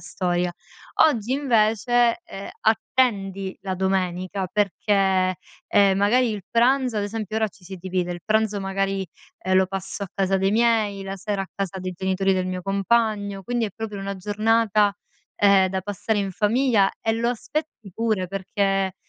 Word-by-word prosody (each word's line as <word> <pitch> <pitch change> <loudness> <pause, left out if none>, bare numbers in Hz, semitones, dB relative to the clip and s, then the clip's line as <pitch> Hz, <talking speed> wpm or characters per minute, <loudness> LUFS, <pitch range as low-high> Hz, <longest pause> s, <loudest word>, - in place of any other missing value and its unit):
storia." 175 -1 -1 0.5
Oggi 240 -4 0
invece, 240 -2 +2
ehm, 200 - -8
attendi 200 -4 0
la 190 -1 -2
domenica 185 0 -1
perché, 195 -2 +1 0.3
ehm, 195 -1 +4
magari 230 +4 +3
il 205 -3 -4
pranzo 250 0 +2
ad 205 - -1
esempio 215 0 -4
ora 220 -1 +1
ci 190 - -22
si 190 +1 -8
divide, 180 0 -2
il 175 - -7
pranzo 215 -2 +1
magari, 195 0 -1 0.3
ehm, 185 0 -1
lo 190 - +5
passo 195 +1 -5
a 195 - -4
casa 195 0 +1
dei 195 +1 +1
miei, 215 -3 +2
la 195 0 -5
sera 200 0 -3
a 190 - -8
casa 195 -2 -3
dei 185 0 -4
genitori 190 +1 +1
del 185 0 0
mio 185 0 -3
compagno, 200 0 0
quindi 240 +2 -1
è - - -7
proprio 215 -2 -5
una 195 0 -4
giornata, 210 +1 +2 0.4
ehm, 200 -2 +5
da 190 0 -2
passare 205 +2 -2
in 195 -1 -2
famiglia 215 0 +2
e 225 - 0
lo 230 +1 0
aspetti 245 -3 -5
pure 215 -5 0
perché 195 0 -1
200 Hz, 165 wpm, -23 LUFS, 190-220 Hz, 0.5 s, lo